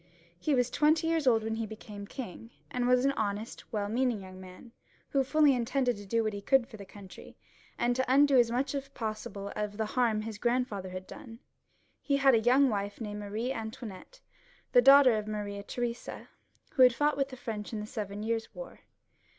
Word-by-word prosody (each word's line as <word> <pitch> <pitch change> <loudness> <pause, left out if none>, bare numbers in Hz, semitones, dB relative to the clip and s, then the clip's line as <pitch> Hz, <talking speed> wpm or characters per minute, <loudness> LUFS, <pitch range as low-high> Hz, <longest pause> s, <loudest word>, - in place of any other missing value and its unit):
He 290 +8 +1
was 245 -1 +1
twenty 310 +4 +3
years 325 -3 0
old 225 -3 +4
when 220 0 -2
he 225 0 -3
became 210 -1 -9
king, 230 -2 -8 0.2
and 245 -1 -1
was 250 +1 +4
an 275 - +4
honest, 215 -3 -3
weU 205 -2 -1
meaning 240 0 0
young 185 0 -11
man, 185 +6 -13 0.4
who 275 -1 +2
folly 295 +1 +4
intended 245 0 0
to 205 -1 -10
do 230 +3 +1
what 215 -1 -1
he 200 - -5
could 265 +3 +3
for 235 -5 -11
the 200 - -10
country, 195 -2 -13 0.4
and 240 0 +1
to 260 +1 0
undo 280 -1 +5
as 235 -1 +4
much 255 +3 -1
as 275 -1 -4
possible 215 -5 -5
of 210 -1 -3
the 220 - 0
harm 220 -1 0
his 220 -1 -7
grandfather 235 -6 -1
had 185 0 -7
done(^ 230 -5 -11 0.6
He 280 -2 +1
had 270 -1 +5
a 230 - +5
young 255 +5 +4
wife 205 -3 -3
named 210 -2 -5
Marie 215 +5 -3
Antoinette, 220 - -8 0.5
the 245 - +6
daughter 270 -2 +7
of 210 - -7
Maria 205 -1 -4
Theresa, 240 +3 -5 0.4
who 265 - 0
had 250 -2 +7
fought 295 +1 +2
with 275 -1 -1
the 260 - -9
French 220 -4 -6
in 220 - -4
the 210 - -5
Seven 210 -2 -5
Years' 225 0 -3
War. - - -9
230 Hz, 205 wpm, -30 LUFS, 210-260 Hz, 0.6 s, daughter